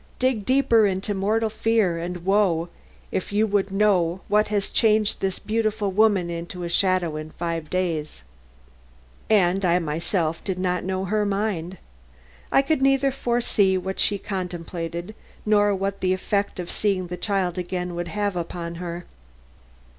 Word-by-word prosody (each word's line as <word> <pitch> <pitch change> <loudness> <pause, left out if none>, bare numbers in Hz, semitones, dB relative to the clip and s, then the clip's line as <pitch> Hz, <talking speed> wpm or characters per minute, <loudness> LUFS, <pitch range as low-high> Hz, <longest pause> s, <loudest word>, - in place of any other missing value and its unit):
Dig 255 -5 0
deeper 245 -5 +4
into 195 +2 -2
mortal 215 +3 +1
fear 220 -6 +1
and 175 +1 -5
woe 190 -4 +2 0.4
if 185 - -3
you 210 +2 +3
would 205 -2 +1
know 190 -3 +2
what 210 +1 +3
has 205 -2 -1
changed 215 -2 +3
this 190 -1 -1
beautiful 215 -2 -1
woman 205 -3 +3
into 170 +1 -5
a 170 - -3
shadow 180 -3 +1
in 155 0 -6
five 165 -2 -4
days." 165 - -2 1.1
And 195 -2 +3
I 175 -1 +4
myself 165 0 -1
did 190 -3 -2
not 180 -1 -1
know 190 0 -2
her 210 +2 +1
mind. 195 -3 -2 0.7
I 275 - +5
could 305 0 0
neither 270 0 +3
foresee 235 -7 +1
what 190 +1 -4
she 205 - +2
contemplated 175 -1 -5 0.3
nor 205 -1 +3
what 195 +1 -3
the 185 0 +2
effect 200 +1 -1
of 175 - -5
seeing 195 -3 0
the 180 0 -5
child 185 -2 -1
again 180 0 -3
would 175 0 -3
have 205 +2 -2
upon 170 0 -4
her. 175 0 -5
190 Hz, 155 wpm, -24 LUFS, 175-210 Hz, 1.1 s, I